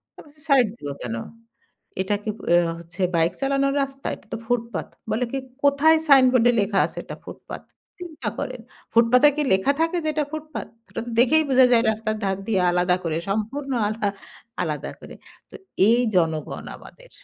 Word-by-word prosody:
আমি -, -, -12 dB
বলছি 300 Hz, 0 st, -21 dB
"সাইড 265 Hz, -3 st, +6 dB
দিব 145 Hz, -, -8 dB
কেন? 115 Hz, -2 st, -4 dB, 0.9 s
এটা 190 Hz, +2 st, 0 dB
কি 215 Hz, -, -3 dB, 0.2 s
আ -, -, +7 dB, 0.2 s
হচ্ছে 170 Hz, +3 st, -13 dB, 0.2 s
বাইক 165 Hz, +1 st, +2 dB
চালানোর 275 Hz, 0 st, +1 dB
রাস্তা, 275 Hz, 0 st, -6 dB
এটা -, -, -18 dB
তো -, -, -1 dB
ফুটপাত।" 230 Hz, -8 st, -2 dB, 0.2 s
বলে 250 Hz, +3 st, 0 dB
কি 275 Hz, -, -1 dB, 0.3 s
"কোথায় 285 Hz, +3 st, +5 dB
সাইনবোর্ডে 255 Hz, -3 st, +6 dB
লেখা 200 Hz, -1 st, 0 dB
আছে -, -, -10 dB
এটা -, -, -8 dB
ফুটপাত?" -, -, -9 dB, 0.4 s
চিন্তা 315 Hz, -10 st, -6 dB
করেন? 255 Hz, -1 st, -4 dB, 0.3 s
ফুটপাতে 250 Hz, +5 st, +5 dB
কি 300 Hz, -, +1 dB
লেখা 190 Hz, +9 st, +3 dB
থাকে 330 Hz, +2 st, +1 dB
যে, 310 Hz, -, 0 dB
এটা 300 Hz, -1 st, +1 dB
ফুটপাত 310 Hz, 0 st, -6 dB, 0.2 s
ওটা -, -, -5 dB
তো -, -, -5 dB
দেখেই 285 Hz, +6 st, +5 dB
বোঝা 260 Hz, -1 st, +6 dB
যায় 230 Hz, -1 st, +5 dB
রাস্তার 215 Hz, 0 st, -2 dB
ধার 195 Hz, 0 st, 0 dB
দিয়ে 205 Hz, -4 st, +1 dB
আলাদা 180 Hz, +1 st, +2 dB
করে 160 Hz, -2 st, -1 dB
সম্পূর্ণ 245 Hz, +7 st, -3 dB, 0.2 s
আলা 215 Hz, -1 st, -1 dB, 0.5 s
আলাদা 150 Hz, -4 st, -3 dB
করে। -, -, -11 dB, 0.4 s
তো -, -, -18 dB, 0.3 s
এই 235 Hz, +2 st, +4 dB, 0.2 s
জনগণ 160 Hz, -3 st, -1 dB
আমাদের! -, -, -16 dB
240 Hz, 175 wpm, -23 LUFS, 195-275 Hz, 0.9 s, আ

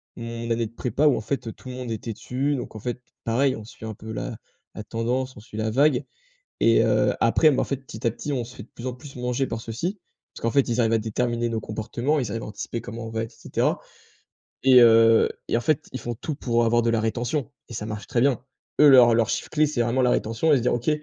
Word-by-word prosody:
mon 115 Hz, 0 st, -6 dB
année 115 Hz, 0 st, 0 dB
de 105 Hz, -, -16 dB
prépa 130 Hz, +5 st, 0 dB
où 140 Hz, -, +4 dB
en -, -, -3 dB
fait, 115 Hz, +2 st, -3 dB
heu, -, -, -3 dB
tout -, -, -15 dB
le 125 Hz, -, -6 dB
monde 125 Hz, -2 st, -5 dB
était 110 Hz, +1 st, -4 dB
dessus. 135 Hz, +6 st, -2 dB
Donc 125 Hz, -4 st, -6 dB
en -, -, -7 dB
fait, 120 Hz, +3 st, -4 dB, 0.2 s
pareil, 130 Hz, +2 st, +2 dB
on 110 Hz, -, -9 dB
suit 110 Hz, -, -11 dB
un 110 Hz, -, -4 dB
peu 110 Hz, +2 st, -8 dB
la -, -, -4 dB, 0.4 s
la 110 Hz, -, -6 dB
tendance, 125 Hz, +3 st, -2 dB
on -, -, -11 dB
suit 110 Hz, -1 st, -11 dB
la 110 Hz, 0 st, 0 dB
vague. 135 Hz, +2 st, +3 dB, 0.6 s
Et -, -, +5 dB
heu, -, -, +2 dB
après 155 Hz, -, +5 dB
mais 135 Hz, -, 0 dB
en -, -, +1 dB
fait, 140 Hz, -, -2 dB
petit 120 Hz, -4 st, -7 dB
à -, -, +4 dB
petit, 145 Hz, +4 st, -5 dB
on 125 Hz, -3 st, -1 dB
se 125 Hz, -, -12 dB
fait -, -, -8 dB
de 115 Hz, -, -15 dB
plus 120 Hz, -, -9 dB
en 125 Hz, -, -2 dB
plus 135 Hz, +2 st, -12 dB
manger 125 Hz, +2 st, -1 dB
par 115 Hz, 0 st, -4 dB
ceux-ci, 165 Hz, -, -4 dB, 0.3 s
parce -, -, -12 dB
qu'en 115 Hz, -, +1 dB
fait, 140 Hz, -2 st, +3 dB
ils 120 Hz, +1 st, +1 dB
arrivent 115 Hz, -1 st, +2 dB
à 115 Hz, -, +4 dB
déterminer 120 Hz, +2 st, -1 dB
nos 115 Hz, -1 st, -2 dB
comportements, 120 Hz, +8 st, -2 dB
ils 120 Hz, -, -3 dB
arrivent 115 Hz, +1 st, -4 dB
à -, -, -7 dB
anticiper 105 Hz, +2 st, -5 dB
comment 115 Hz, +1 st, -7 dB
on -, -, -6 dB
va 110 Hz, 0 st, -2 dB
être 115 Hz, -, -11 dB
et -, -, -21 dB
cetera. -, -, 0 dB, 0.8 s
Et 130 Hz, -1 st, +7 dB
heu, 115 Hz, -1 st, +6 dB, 0.2 s
et -, -, +2 dB
en -, -, -3 dB
fait, 155 Hz, +2 st, 0 dB
ils 130 Hz, -, -5 dB
font 120 Hz, +1 st, -4 dB
tout 145 Hz, +6 st, -5 dB
pour 120 Hz, -3 st, +1 dB
avoir 120 Hz, +1 st, +3 dB
de 115 Hz, -, 0 dB
la 115 Hz, -1 st, +1 dB
rétention 120 Hz, +5 st, -1 dB, 0.2 s
et 120 Hz, -, -9 dB
ça 105 Hz, -, -4 dB
marche 105 Hz, -1 st, -6 dB
très 120 Hz, -2 st, 0 dB
bien. 135 Hz, -4 st, +2 dB, 0.4 s
Eux, 150 Hz, -, +9 dB
leur 125 Hz, -4 st, +8 dB
leur 115 Hz, -1 st, +2 dB
chiffre -, -, -2 dB
clé, 155 Hz, 0 st, +3 dB
c'est 140 Hz, -5 st, 0 dB
vraiment 120 Hz, +3 st, +1 dB
la 125 Hz, -, +3 dB
rétention 115 Hz, +9 st, +1 dB
et 145 Hz, -, +6 dB
se 120 Hz, -, 0 dB
dire: 125 Hz, -, +2 dB
«OK, 120 Hz, +3 st, -3 dB
120 Hz, 275 wpm, -24 LUFS, 115-130 Hz, 0.8 s, Eux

